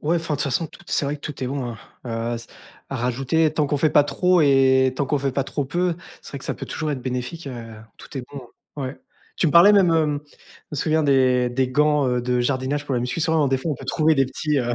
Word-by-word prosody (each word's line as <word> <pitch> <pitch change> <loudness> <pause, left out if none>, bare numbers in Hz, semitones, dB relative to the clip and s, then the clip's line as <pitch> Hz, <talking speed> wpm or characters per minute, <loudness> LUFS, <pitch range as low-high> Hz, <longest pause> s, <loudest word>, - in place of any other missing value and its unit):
ouais, 160 +3 +1
enfin 165 -2 -2
de - - -4
toute - - +4
façon, 150 +4 0
tout - - -16
est - - -15
c'est - - +1
vrai 140 +1 -1
que 145 - -10
tout 145 -3 -5
est - - -2
bon, 130 -2 -3
heu - - -12 0.3
heu, 115 0 -2
s 115 0 -8 0.4
à 135 - -4
rajouter. 135 +6 +1
Tant 150 -2 0
qu'on 145 - +1
fait 155 +3 +3
pas 145 - +6
trop 180 +4 +2
et 130 -2 +4
tant 140 - 0
qu'on 145 +2 0
fait 135 0 0
pas 135 +1 -1
trop 145 0 -3
peu, 175 +5 0 0.3
c'est - - -11
vrai 140 - -5
que - - -11
ça - - -2
peut - - -7
toujours 155 -1 -3
être 140 -3 -3
bénéfique, 130 +6 -4
heu, 115 -4 -8 0.2
tout 140 - -8
est 125 - -6
bon. 135 -4 -9 0.3
Ouais. 135 -1 -5 0.4
Tu - - +2
me 150 - +1
parlais 170 +4 +8
même 190 -4 +5
hem, 155 -3 +1
je - - -23
me - - -3
souviens 155 +3 +1
des 130 -3 +3
des 130 +1 0
gants, 150 +1 +2
heu, 125 0 0
de 125 0 0
jardinage 130 +3 -1
pour 140 - -2
la 120 - 0
muscu, 125 +7 -2
souvent 160 -2 +2
des 135 0 +1
fois 145 +5 -3
on 145 - -2
peut 135 - -10
trouver 155 +4 +2
des 135 -1 +3
petits 150 +3 -1
heu, 120 -2 -1
140 Hz, 280 wpm, -22 LUFS, 130-155 Hz, 0.4 s, parlais